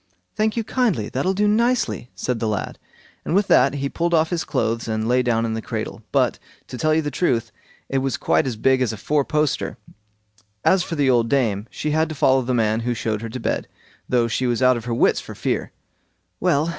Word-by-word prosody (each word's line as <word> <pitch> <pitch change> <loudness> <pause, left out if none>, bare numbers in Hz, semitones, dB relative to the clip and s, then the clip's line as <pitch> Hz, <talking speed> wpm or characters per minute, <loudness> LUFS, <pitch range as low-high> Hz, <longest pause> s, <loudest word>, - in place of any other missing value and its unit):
"Thank 215 +1 0
you 230 - +1
kindly, 215 - 0
that'll 185 +9 -1
do 210 +2 +2
nicely", 235 - +1
said 125 -2 -2
the 110 - -1
lad; 105 -1 -3 0.4
and 170 - -1
with 200 +1 +3
that 135 +1 +5
he 140 0 -1
pulled 170 +4 0
off 160 +1 +2
his 170 -2 -1
clothes 115 +1 -1
and 110 0 -1
lay 125 +1 +3
down 115 -2 +1
in 110 - -2
the 110 - -3
cradle; - - -5
but, - - +1 0.3
to 125 - -6
tell 155 +5 +2
you 160 - +1
the 145 - -3
truth; 115 -10 0 0.4
it 135 - 0
was 135 -1 -1
quite - - +1
as 125 - -2
big 130 +4 +2
as 125 - +1
a 110 - -6
four 145 +8 +1
poster. 150 0 -1 0.9
As 190 - +5
for 175 - -4
the 140 -3 +3
old 115 -2 +2
dame, 115 -6 +1
she 150 - -3
had 160 +1 +1
to 155 - -5
follow 135 -1 +3
the 125 0 -1
man 110 -1 +2
who 120 +1 -2
showed 110 -2 -2
her 115 - -5
to 125 - -6
bed, - - -2 0.4
though 120 -2 +2
she 125 +2 -1
was 120 -1 0
out 130 0 +5
of 120 -1 -6
her 120 - -2
wits - - +3
for - - -10
fear. - - -2 0.7
"Well!" 150 +4 +2
130 Hz, 230 wpm, -22 LUFS, 115-160 Hz, 0.9 s, that